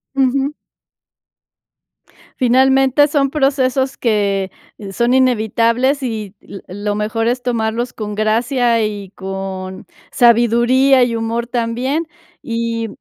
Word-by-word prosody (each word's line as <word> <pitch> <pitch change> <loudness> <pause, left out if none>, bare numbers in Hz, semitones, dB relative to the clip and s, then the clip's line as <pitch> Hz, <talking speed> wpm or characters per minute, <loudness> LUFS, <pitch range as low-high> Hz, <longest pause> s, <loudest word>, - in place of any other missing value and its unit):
Ujú. 270 +1 +1 1.9
Finalmente, 265 +2 +3
son 280 -2 +1
procesos 270 -2 0
que 200 -4 0 0.4
son 235 +5 +1
inevitables 250 +2 +1
y 215 -5 -4
l 195 - -11
lo 205 +2 -4
mejor 220 +2 -1
es 245 +1 0
tomarlos 235 0 -2
con 210 -1 -6
gracia 230 +2 +1
y 205 -2 -4
con 190 -1 -6 0.3
sabiduría 240 +3 +4
y 240 -1 0
humor 230 +1 -2
también, 250 +6 -2 0.3
y 230 -1 -3
235 Hz, 100 wpm, -17 LUFS, 215-260 Hz, 1.9 s, sabiduría